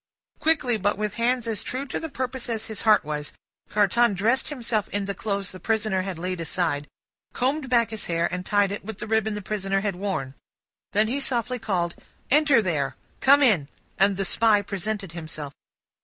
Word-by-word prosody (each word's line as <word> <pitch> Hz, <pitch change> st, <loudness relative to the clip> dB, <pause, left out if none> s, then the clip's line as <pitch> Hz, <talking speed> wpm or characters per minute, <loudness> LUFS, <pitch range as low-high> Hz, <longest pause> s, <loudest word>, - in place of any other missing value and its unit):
Quickly, 305 Hz, -7 st, +3 dB
but 205 Hz, 0 st, 0 dB
with 210 Hz, -1 st, -2 dB
hands 245 Hz, 0 st, +2 dB
as 220 Hz, -3 st, 0 dB
true 260 Hz, +2 st, -3 dB
to 270 Hz, -, -3 dB
the 320 Hz, -, -5 dB
purpose 255 Hz, -2 st, -4 dB
as 225 Hz, -1 st, -2 dB
his 220 Hz, -3 st, -4 dB
heart 215 Hz, -7 st, +4 dB
was, 150 Hz, 0 st, -4 dB, 0.4 s
Carton 210 Hz, +2 st, +3 dB
dressed 230 Hz, +7 st, +2 dB
himself 235 Hz, -7 st, -2 dB
in 205 Hz, 0 st, -1 dB
the 200 Hz, -, -2 dB
clothes 200 Hz, 0 st, -3 dB
the 185 Hz, -, -10 dB
prisoner 215 Hz, -1 st, 0 dB
had 185 Hz, -2 st, -4 dB
laid 180 Hz, 0 st, -3 dB
aside, 160 Hz, -4 st, -1 dB, 0.5 s
combed 270 Hz, +2 st, 0 dB
back 235 Hz, -2 st, +3 dB
his 220 Hz, -2 st, -3 dB
hair, 170 Hz, 0 st, 0 dB
and 180 Hz, 0 st, -2 dB
tied 205 Hz, 0 st, +2 dB
it 200 Hz, -, -5 dB
with 220 Hz, 0 st, -6 dB
the -, -, -4 dB
ribbon 220 Hz, -1 st, +1 dB
the 210 Hz, -, -5 dB
prisoner 195 Hz, -1 st, -1 dB
had 200 Hz, -2 st, -1 dB
worn. 180 Hz, -9 st, -3 dB, 0.6 s
Then, 210 Hz, +2 st, +4 dB
he 260 Hz, +5 st, -1 dB
softly 250 Hz, -1 st, -1 dB
called, 180 Hz, -6 st, -1 dB, 0.4 s
"Enter 290 Hz, -5 st, +5 dB
there! 150 Hz, -7 st, -1 dB, 0.2 s
Come 285 Hz, +2 st, +6 dB
in!" 190 Hz, -, +4 dB, 0.3 s
and 195 Hz, 0 st, +4 dB
the 195 Hz, -, 0 dB
Spy 210 Hz, +1 st, +4 dB
presented 200 Hz, -1 st, -3 dB
himself. 155 Hz, -4 st, -7 dB
210 Hz, 190 wpm, -25 LUFS, 185-235 Hz, 0.6 s, Come